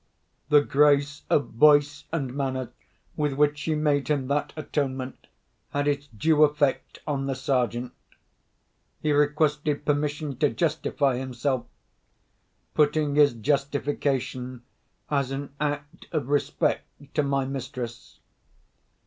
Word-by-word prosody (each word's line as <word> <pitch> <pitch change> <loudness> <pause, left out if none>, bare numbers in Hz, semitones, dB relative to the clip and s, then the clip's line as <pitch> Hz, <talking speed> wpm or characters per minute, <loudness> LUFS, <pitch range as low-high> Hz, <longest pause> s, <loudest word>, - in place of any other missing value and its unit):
The 150 -1 +7
grace 145 0 +3
of 145 - +2
voice 145 +3 +4
and 140 -6 -2
manner 130 -2 -2 0.4
with 150 -2 0
which 145 +1 +2
she 155 0 -1
made 150 -2 +1
him 140 -3 0
that 145 +1 0
atonement 135 -4 -3 0.4
had 145 0 -1
its 145 0 0
due 150 +6 +3
effect 145 -2 +1
on 135 -2 -2
the 135 - -1
Sergeant. 125 -2 -1 1.1
He 155 - 0
requested 150 0 +1
permission 145 -1 -1
to 145 +2 +3
justify 150 -5 0
himself—putting 140 +3 -3
his 145 -2 +5
justification 135 -1 -1 0.5
as 140 -3 +1
an 135 0 -5
act 145 0 -3
of 150 -5 -2
respect 145 0 -1
to 150 - +2
my 140 -1 0
mistress. 130 -3 -6
145 Hz, 115 wpm, -26 LUFS, 135-150 Hz, 1.1 s, The